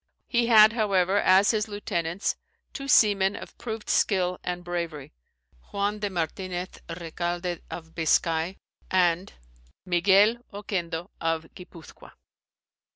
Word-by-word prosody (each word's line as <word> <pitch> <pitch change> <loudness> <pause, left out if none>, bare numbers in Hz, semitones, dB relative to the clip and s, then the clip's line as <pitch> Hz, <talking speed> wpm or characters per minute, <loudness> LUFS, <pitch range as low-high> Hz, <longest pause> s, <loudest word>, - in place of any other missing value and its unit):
He 240 -1 +1
had, 220 -1 +7
however, 200 -4 +2
as 190 +1 +5
his 215 -1 -1
lieutenants, 180 -4 -2 0.4
two 275 - -6
sea 215 -6 +6
men 195 0 0
of - - -10
proved 225 -2 -6
skill 180 -3 +1
and 180 0 -4
bravery, 170 - -5 0.6
Juan 205 +1 -1
de 205 -1 -2
Martinez 180 +1 -3 0.2
Recalde 175 +1 -4
of 165 -1 -8
Biscay, 165 +2 +1 0.3
and 180 0 +1 0.5
Miguel 195 +5 +4
Orquendo 180 -4 -4
of 165 -1 0
Guipuzcoa. 180 -3 -14
185 Hz, 115 wpm, -26 LUFS, 170-205 Hz, 0.6 s, had